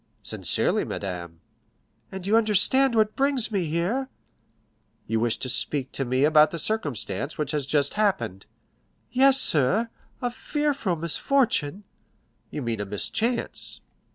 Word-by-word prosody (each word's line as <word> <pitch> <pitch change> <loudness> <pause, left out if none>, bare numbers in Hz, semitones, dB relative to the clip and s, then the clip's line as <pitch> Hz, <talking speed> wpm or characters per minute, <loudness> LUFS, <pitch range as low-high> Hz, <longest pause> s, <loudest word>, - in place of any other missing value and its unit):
"Sincerely, - - +2
madame." 85 -4 -6 0.7
"And 190 -1 -7
you 205 +3 +2
understand 230 +4 +3
what 215 -1 +2
brings 270 -4 +2
me 195 -5 -1
here?" 180 - -2 1.0
"You 110 +1 -1
wish 115 0 0
to - - -5
speak 130 +1 +1
to 135 - -3
me 130 +2 0
about 150 0 +5
the 170 - -6
circumstance 145 - -2
which 150 -2 -2
has 145 -3 -2
just 145 -2 +1
happened?" 120 - -1 0.6
"Yes, 270 +1 +5
sir,—a 225 - 0
fearful 280 - -2
misfortune." 170 - 0 0.7
"You 150 - -5
mean 115 -3 -3
a - - -3
mischance." 220 - -3
170 Hz, 125 wpm, -25 LUFS, -, 1.0 s, about